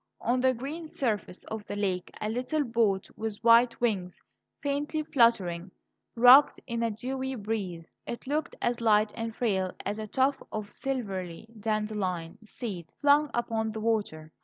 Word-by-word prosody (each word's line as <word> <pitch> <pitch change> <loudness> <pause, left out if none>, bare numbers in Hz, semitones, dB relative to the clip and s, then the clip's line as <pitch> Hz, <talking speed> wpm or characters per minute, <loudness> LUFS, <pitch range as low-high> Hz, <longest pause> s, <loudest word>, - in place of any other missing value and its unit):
On 245 +2 +1
the 260 0 +3
green 300 +7 -6
surface 215 -10 -2
of 220 -1 -6
the 205 - -5
lake 190 -3 -1
a 210 - -2
little 255 +7 -1
boat, 230 -6 +1
with 220 -1 -4
white 235 +1 +6
wings 195 -7 -1 0.4
faintly 290 +2 -1
fluttering, 195 - +2 0.5
rocked 250 +4 +8
in 235 -2 -3
the 230 0 +1
dewy 260 +4 -3
breeze. 200 -7 -4 0.2
It 235 - -5
looked 295 +3 -2
as 240 0 0
light 215 -1 +3
and 225 -1 -4
frail 190 -6 0 0.2
as 205 +2 -2
a 215 - -4
tuft 265 +4 +1
of 210 -1 -5
silvery 195 -10 -4
dandelion 210 -5 -2
seed 210 -6 -6
flung 290 +1 +4
upon 225 -2 -1
the 220 - -4
water. 205 -9 -1
225 Hz, 155 wpm, -29 LUFS, 205-250 Hz, 0.5 s, rocked